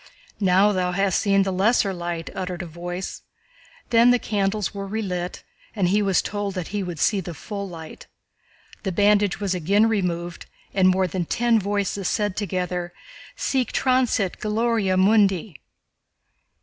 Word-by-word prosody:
"Now 195 +1 +4
thou 180 -2 0
hast 195 0 +1
seen 195 -2 +3
the 190 -1 -2
lesser 200 +1 +2
light," 170 -2 -4
uttered 180 -1 -4
a - - -6
voice. 175 +3 -6 0.7
Then 235 +1 +6
the 245 - +5
candles 205 -3 -1
were 200 -1 -5
relit 190 -4 -4 0.3
and 190 -4 +1
he 205 +3 +3
was 195 -2 +2
told 205 -1 -3
that 180 -3 -4
he 205 -1 -2
would 175 -3 -5
see 205 +5 +2
the 175 -2 -6
full 200 +5 -6
light; 160 -2 -10 0.7
the 190 - -2
bandage 205 +1 +3
was 200 -2 -1
again 195 +5 +3
removed 175 -5 -2 0.3
and 190 -1 +4
more 185 0 +3
than 180 0 -2
ten 235 +4 +2
voices 200 -1 -1
said 205 -3 -1
together: 180 -3 -3 0.4
"Sic 260 -2 -1
transit 255 -7 +1
gloria 215 -3 +1
mundi." 195 -4 +2
195 Hz, 150 wpm, -23 LUFS, 180-210 Hz, 0.7 s, Then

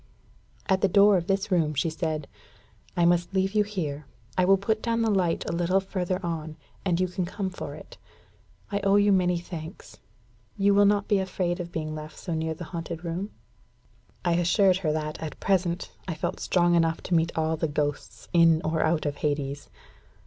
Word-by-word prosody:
At 190 -1 +2
the 195 - +4
door 200 +2 +6
of 175 -1 0
this 195 +1 0
room 160 -4 +2
she 160 +4 0
said, 155 -3 -3 0.7
"I 170 - +4
must 175 +2 +2
leave 190 +1 +1
you 210 -1 +4
here. 155 -9 -4 0.3
I 185 - +3
will 195 +1 +5
put 215 +3 -1
down 230 -1 0
the 225 - +2
light 180 -4 +1
a - - -1
little 175 +3 +2
further 185 -1 -2
on, 160 -2 -4 0.3
and 180 -3 +1
you 185 - +2
can 180 +1 -3
come 190 +2 -3
for - - -7
it. - - -13 0.7
I 200 - 0
owe 200 0 +3
you 205 0 +5
many 180 -2 +3
thanks. 170 0 -9 0.6
You 200 0 +4
will 200 0 +5
not 205 0 +2
be 205 -2 +3
afraid 185 -1 -2
of 170 -1 -5
being 155 -2 -3
left 155 0 -8
so 170 - -5
near 160 0 -2
the 175 - -7
haunted 165 0 -5
room?" 175 +5 -3 1.0
I 175 - +3
assured 180 +2 +3
her 170 -5 -1
that 155 0 -3
at 160 -2 -6
present 180 -2 0 0.2
I 165 - -2
felt 175 +4 -3
strong 175 -1 +2
enough 165 -1 +2
to - - -3
meet 165 0 +1
all 160 0 +1
the 160 +1 -1
ghosts 145 -1 -3
in 165 -2 +6
or 160 0 0
out 160 0 +1
of 145 -1 -2
Hades. 145 -1 -2
175 Hz, 200 wpm, -26 LUFS, 160-195 Hz, 1.0 s, door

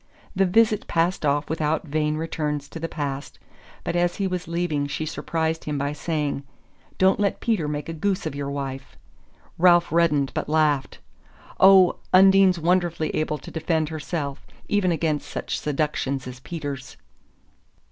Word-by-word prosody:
The 190 0 +3
visit 220 +2 +3
passed 165 -1 +1
off 145 +1 +1
without 160 +1 -1
vain 150 +1 0
returns 150 -3 -3
to 165 - -8
the 165 - -3
past; 140 -4 -5 0.5
but - - -2
as 175 0 +1
he 200 - -1
was 180 -2 -3
leaving 165 -4 -1
she 145 +2 -3
surprised 160 +1 -2
him 150 -1 -2
by 140 +1 -1
saying: 150 -2 -2 0.6
"Don't 190 +1 +3
let 205 -1 0
Peter 215 -10 0
make 150 0 -4
a 165 - -4
goose 190 +4 -1
of - - -3
your 140 0 -4
wife." 135 -1 -6 0.6
Ralph 175 -1 +5
reddened, 150 -5 +2
but - - -3
laughed. 150 -3 +1 0.6
"Oh, 190 -1 +7
Undine's 190 0 +6
wonderfully 170 -1 +1
able 155 0 -1
to - - -11
defend 160 -1 -1
herself, 150 -2 -4 0.2
even 205 -3 +2
against 155 -3 -1
such - - -3
seductions 140 -2 -1
as 125 0 -8
Peter's." 140 -3 -6
160 Hz, 155 wpm, -24 LUFS, 145-175 Hz, 0.6 s, Oh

